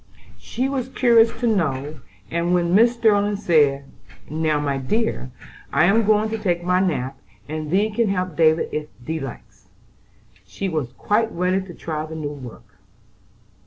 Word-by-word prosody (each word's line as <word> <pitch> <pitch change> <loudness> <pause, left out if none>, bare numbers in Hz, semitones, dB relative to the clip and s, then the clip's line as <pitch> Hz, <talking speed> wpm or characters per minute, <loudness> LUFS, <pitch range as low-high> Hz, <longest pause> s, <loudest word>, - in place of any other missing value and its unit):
She 255 +3 -2
was 265 -2 -3
curious 235 -3 +4
to - - +1
know, 150 - -1 0.3
and 170 +1 +1
when 175 0 +1
Mrs. 235 +3 +5
Sterling 210 -3 +2
said: 145 -7 +2 0.4
"Now, 155 -1 0
my 140 -2 -1
dear, 215 - -1 0.4
I 155 +4 +4
am 205 +3 +3
going 215 0 +3
to 225 - -2
take 175 -3 -1
my 180 +1 +2
nap, 135 -8 -1 0.3
and 155 0 -5
thee 205 +6 +2
can 225 0 +1
help 185 -4 -2
David 160 0 +3
if 150 0 -3 0.2
thee 160 0 -2
likes," 110 -8 -10 0.8
she 95 - -5
was 155 -9 -2
quite 225 +2 0
ready 180 +2 0
to 185 -3 -10
try 155 -2 -4
the 160 - -8
new 150 -2 -4
work. 115 -6 -12
170 Hz, 160 wpm, -22 LUFS, 145-210 Hz, 0.8 s, Mrs